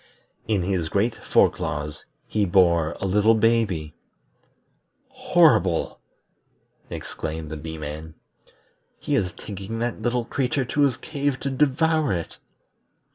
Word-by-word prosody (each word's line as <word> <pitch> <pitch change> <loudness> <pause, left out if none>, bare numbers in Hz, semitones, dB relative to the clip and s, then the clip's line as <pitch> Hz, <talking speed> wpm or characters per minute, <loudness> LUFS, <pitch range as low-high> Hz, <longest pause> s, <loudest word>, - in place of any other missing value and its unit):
In 105 -5 +1
his 90 -4 -1
great 105 +6 +1
fore - - +3
claws 75 +1 -5 0.2
he 105 - 0
bore 85 -4 +3
a - - -3
little 105 +4 +4
baby. 110 -9 +1 1.2
"Horrible!" 95 - +3 0.9
exclaimed 80 -1 -5
the - - -4
Bee 80 +2 -7
man. 75 +1 -7 0.8
"He - - -3
is 90 -3 +1
taking 100 +2 -7
that 120 +1 -3
little 120 -1 0
creature 130 +1 -1
to 145 +4 -1
his 135 -3 +3
cave 145 -1 -2
to 140 - -2
devour 150 - +2
it." 85 -2 -5
100 Hz, 125 wpm, -24 LUFS, 80-125 Hz, 1.2 s, little